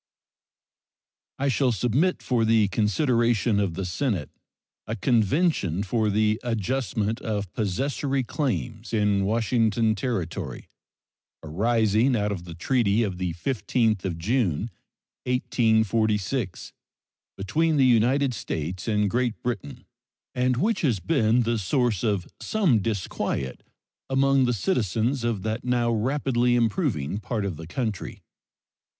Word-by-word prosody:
I 140 - 0
shall 130 -1 +2
submit 125 - +1
for 120 -3 +1
the 110 -2 +4
consideration 115 0 +2
of 95 -5 -1
the 95 +1 -3
Senate 90 - -2 0.6
a 110 - -2
convention 115 - +1
for 110 +2 0
the 105 +2 +1
adjustment 115 -1 -1
of 100 -4 -3
possessory 135 +6 -1
claims 120 -5 -3
in 105 -2 +2
Washington 115 0 +2
Territory 95 -6 -4 0.8
arising 110 - +2
out 105 -2 0
of 90 -4 -5
the 85 -2 -8
treaty 110 +3 +1
of 95 -4 -3
the 90 -2 -2
15th 105 -3 0
June, 105 - 0 0.6
1846, 110 -3 0 0.6
between 155 +11 +1
the 135 - +5
United 125 +3 +3
States 90 -2 -4
and 105 -2 +2
Great 120 +2 -1
Britain, 115 -12 -4 0.5
and 125 0 +1
which 220 - +1
have 120 - 0
been 120 -6 +3
the 115 0 0
source 110 0 0
of 100 -6 0
some 185 - +2
disquiet 95 - -3 0.5
among 135 0 +3
the 125 - +1
citizens 120 - 0
of 115 -5 -1
that 110 +2 -2
now 120 -1 +1
rapidly 120 +1 +1
improving 110 - 0
part 110 0 -3
of 95 -4 -3
the 80 +1 -9
country. 110 0 -4
115 Hz, 120 wpm, -25 LUFS, 100-125 Hz, 0.8 s, the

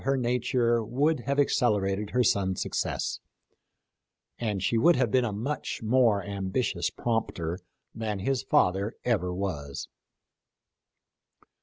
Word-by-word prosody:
her 135 0 +1
nature 120 -1 +1
would 140 +7 +1
have 140 0 +1
accelerated 105 -7 +1
her 125 0 +2
son's 95 -4 +1
success, - - -2 1.2
and 105 -5 -2
she - - +1
would 165 +9 +5
have 125 -4 +1
been 130 -1 +3
a 120 - -1
much 120 +5 -4
more 110 -3 +3
ambitious 95 -2 -1
prompter 100 -7 -2 0.3
than 110 -2 -3
his 130 +7 0
father 95 +4 +1
ever 105 -7 +1
was. 85 -7 -4
110 Hz, 120 wpm, -28 LUFS, 95-125 Hz, 1.2 s, would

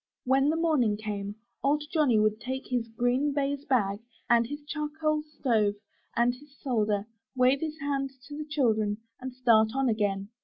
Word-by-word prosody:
When 270 +2 +3
the 315 - +2
morning 300 -11 +2
came. 205 -1 -4 0.3
Old 295 +2 +2
Johnny 295 -8 +4
would 215 +1 +1
take 260 +3 -4
his 245 -2 -1
green 245 +5 +1
baize 285 0 -1
bag, 205 -7 +1 0.3
and 235 -1 +4
his 290 +3 -6
charcoal 305 0 -1
stove 240 -9 0 0.4
and 240 +1 +3
his 280 +2 -17
solder, 210 -6 0 0.3
wave 255 +2 +4
his 315 0 -4
hand 275 -1 -1 0.2
to 290 - -7
the 305 0 -6
children, 220 -8 +1 0.2
and 260 0 -5
start 230 -3 +4
on 270 -2 +2
again. 205 -2 0
255 Hz, 165 wpm, -28 LUFS, 220-290 Hz, 0.4 s, Johnny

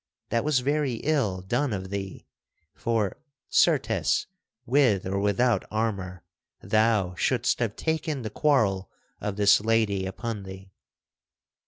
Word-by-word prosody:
that 115 - +1
was 145 -4 +2
very 140 -1 0
ill 115 -12 0
done 140 +8 0
of 95 -2 -4
thee; 95 -1 -5 0.5
for, 110 -5 -1 0.3
certes, - - +2 0.4
with 125 -7 +3
or 95 +1 -1
without 105 +2 +2
armor 100 -5 -3 0.4
thou 110 -4 +2
shouldst 120 +6 0
have 115 -3 -1
taken 155 -4 -2
the 110 - -5
quarrel 105 -10 +1 0.3
of 105 -2 -3
this 100 0 +5
lady 110 -4 +1
upon 110 +2 -5
thee. 95 0 -10
110 Hz, 125 wpm, -26 LUFS, 95-125 Hz, 0.5 s, this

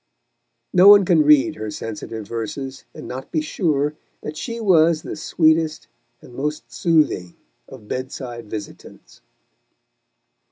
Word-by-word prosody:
No 185 +1 +6
one 205 -1 +9
can 170 -3 +4
read 150 +1 +4
her 110 0 -5
sensitive 110 0 -7
verses, 130 +4 -6
and - - -10
not 130 +1 -8
be 160 - 0
sure 150 -2 -1 0.3
that 150 - -6
she 230 +8 -5
was 170 -6 +3
the - - -6
sweetest 160 0 +1 0.4
and 125 - -14
most 135 -3 -4
soothing 140 - +1 0.3
of 105 - -13
bed 130 +3 -4
side 120 -4 -8
visitants. 105 -2 -10
150 Hz, 130 wpm, -21 LUFS, 115-160 Hz, 0.4 s, one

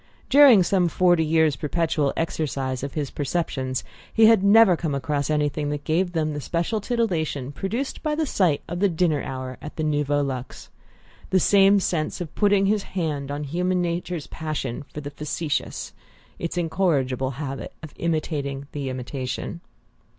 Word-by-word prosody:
During 265 -8 +8
some 180 -1 +2
forty 175 -1 +3
years' 160 -2 +3
perpetual 155 -1 0
exercise 135 -5 -2
of 140 +1 -5
his 145 -3 -2
perceptions 135 -4 -2 0.3
he 225 - +5
had 220 -3 +6
never 200 -2 +7
come 160 -4 -2
across 145 +1 -1
anything 150 -1 0
that 145 0 -3
gave 175 +4 0
them 155 -2 0
the 145 - -4
special 170 +9 -1
titillation 170 - -1
produced 220 - -3
by 305 -1 -1
the 315 0 0
sight 180 - +1
of 175 +1 -4
the 200 +1 +3
dinner 165 -3 +1
hour 130 -1 -6
at 150 - -8
the 155 - -2
Nouveau 145 -1 +1
Luxe: 130 -2 -6 0.6
the 185 - +3
same 200 +2 +5
sense 160 -5 -1
of 175 -4 -6
putting 205 -1 +3
his 205 +1 +2
hand 155 -8 -3
on 145 +1 -3
human 180 +5 0
nature's 175 -2 -2
passion 155 -6 -4
for 150 - -6
the 145 0 -7
factitious, 150 +1 -3 0.5
its 170 +1 -4
incorrigible 140 -7 0
habit 135 -2 -5
of 155 - -9
imitating 150 -4 -2
the 140 -2 -4
imitation. 130 +5 -5
155 Hz, 160 wpm, -24 LUFS, 145-180 Hz, 0.6 s, During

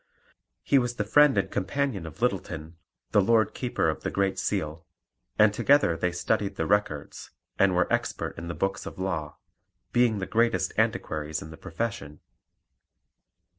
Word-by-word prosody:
He 140 - +4
was 120 -1 -2
the 105 - -1
friend 145 +3 +5
and 95 -1 0
companion 105 -2 -2
of 80 +9 -9
Littleton, 85 -8 -2 0.4
the 105 - +5
Lord 110 +2 +3
Keeper 125 -2 -1
of - - -1
the - - -2
Great 100 -1 0
Seal, 80 -5 -2 0.5
and 105 -1 +5
together 140 - +3
they 90 +2 -1
studied 100 +3 -1
the 80 - -1
Records, 90 -7 -1 0.3
and 95 -2 +4
were 90 0 +3
expert - - -2
in 85 - -7
the 85 - -4
Books 95 0 -2
of - - -8
Law, 85 -5 -3 0.6
being 120 -3 +3
the 95 - -3
greatest 115 +3 +1
antiquaries 75 0 -1
in 80 - -10
the - - -9
profession. 85 -6 -5
95 Hz, 160 wpm, -27 LUFS, 85-110 Hz, 0.6 s, friend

